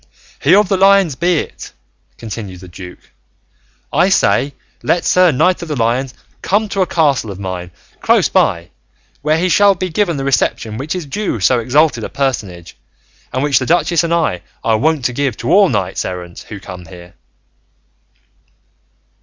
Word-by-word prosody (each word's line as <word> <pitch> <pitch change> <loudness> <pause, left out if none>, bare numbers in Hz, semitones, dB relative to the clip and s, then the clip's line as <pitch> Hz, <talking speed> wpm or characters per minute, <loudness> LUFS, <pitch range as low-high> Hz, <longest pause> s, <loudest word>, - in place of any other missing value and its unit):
"He - - +5
of 205 0 +4
the 195 0 +1
Lions 195 -4 +4
be 175 +5 +1
it," - - -10 0.4
continued 105 -5 -7
the 90 - -11
duke; 90 +1 -12 0.8
"I 185 - +3
say, 140 - +2 0.3
let 175 - 0
Sir 180 -2 +4
Knight 180 +7 +1
of 170 - -6
the 150 - -3
Lions 125 +2 -1 0.3
come 210 +3 +1
to 195 -1 -1
a 185 - +2
castle 145 -10 +1
of 100 - -7
mine 90 -2 -5 0.3
close - - +3
by, 85 +1 0 0.5
where 155 +2 +1
he 180 +3 +1
shall 195 +3 +4
be 185 +1 -3
given 170 -2 0
that 135 - -3
reception 115 -5 0
which 150 +6 -3
is 180 -4 -4
due 200 +6 -3
to 95 - -1
so 125 -2 +3
exalted 130 0 +2
a - - -4
personage, 100 -11 -3 0.6
and 130 - -1
which 145 -2 +3
the 130 - -4
duchess 170 0 +2
and 170 - -2
I 160 - 0 0.2
are 115 - +2
wont 155 -1 0
to 125 - 0
give 135 -3 -1
to - - -3
all 200 -1 +6
knights 95 - -2
errant 90 -1 -7
who 105 - -7
come 90 -2 -10
there." 85 +1 -13
140 Hz, 180 wpm, -16 LUFS, -, 0.8 s, all